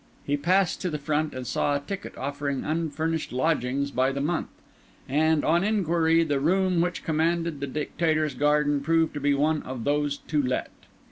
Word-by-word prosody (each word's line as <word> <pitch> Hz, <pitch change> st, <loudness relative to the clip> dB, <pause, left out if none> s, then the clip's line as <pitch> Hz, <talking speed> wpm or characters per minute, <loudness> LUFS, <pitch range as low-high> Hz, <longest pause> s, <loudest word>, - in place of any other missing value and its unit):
He 145 Hz, -, +1 dB
passed 180 Hz, +6 st, +1 dB
to 185 Hz, -, -1 dB
the 155 Hz, -, -3 dB
front 150 Hz, +1 st, -1 dB
and 130 Hz, -1 st, -5 dB
saw 145 Hz, +3 st, 0 dB
a -, -, 0 dB
ticket 195 Hz, +7 st, -7 dB
offering 140 Hz, 0 st, -3 dB
unfurnished 160 Hz, 0 st, -2 dB
lodgings 140 Hz, 0 st, 0 dB
by 130 Hz, 0 st, +1 dB
the 140 Hz, -, -3 dB
month; 155 Hz, +4 st, -1 dB, 0.6 s
and, 155 Hz, +2 st, +2 dB
on 170 Hz, +3 st, +3 dB
inquiry, 170 Hz, -5 st, +2 dB
the 145 Hz, -4 st, 0 dB
room 180 Hz, +3 st, +2 dB
which 175 Hz, +1 st, -2 dB
commanded 165 Hz, 0 st, 0 dB
the 140 Hz, -, -3 dB
Dictator's 155 Hz, +1 st, 0 dB
garden 145 Hz, +1 st, +2 dB
proved 165 Hz, +2 st, +2 dB
to 150 Hz, -, -4 dB
be 145 Hz, 0 st, +2 dB
one 150 Hz, +2 st, +1 dB
of 125 Hz, -3 st, -6 dB
those 145 Hz, +1 st, 0 dB
to 150 Hz, -2 st, -1 dB
let. 130 Hz, -1 st, -2 dB
150 Hz, 180 wpm, -26 LUFS, 140-165 Hz, 0.6 s, on